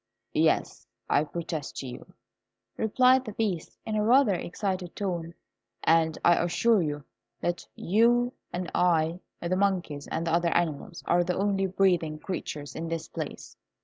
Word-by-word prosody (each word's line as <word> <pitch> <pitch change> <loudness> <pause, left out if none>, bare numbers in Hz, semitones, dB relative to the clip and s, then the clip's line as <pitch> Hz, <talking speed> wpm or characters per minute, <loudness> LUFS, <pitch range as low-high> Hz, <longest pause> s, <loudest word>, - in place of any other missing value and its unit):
"Yes, 160 0 +1 0.2
I 145 - +4
protest 160 -2 -5
to 135 - -4
you," 125 0 -9 0.6
replied 255 +4 +4
the 215 -4 -7
Beast, 200 -7 -2
in 220 - -2
a 210 - +2
rather 245 -1 +5
excited 185 0 -3
tone; 175 -4 -3 0.5
"and 160 -1 +3
I 175 - +6
assure 185 +5 +3
you 150 -3 -3 0.4
that 175 0 -2
you 240 +5 +3 0.2
and 180 0 -4
I, 170 -1 +2 0.2
the 175 +2 0
monkeys, 185 -7 0
and 165 +1 -2
the 165 - 0
other 170 0 +3
animals, 170 +1 -2
are 175 0 +3
the 180 0 -1
only 195 0 +1
breathing 175 -5 +2
creatures 150 -4 -5
in 165 - -4
this 165 -1 -3
place." - - -6
175 Hz, 150 wpm, -28 LUFS, 165-200 Hz, 0.6 s, I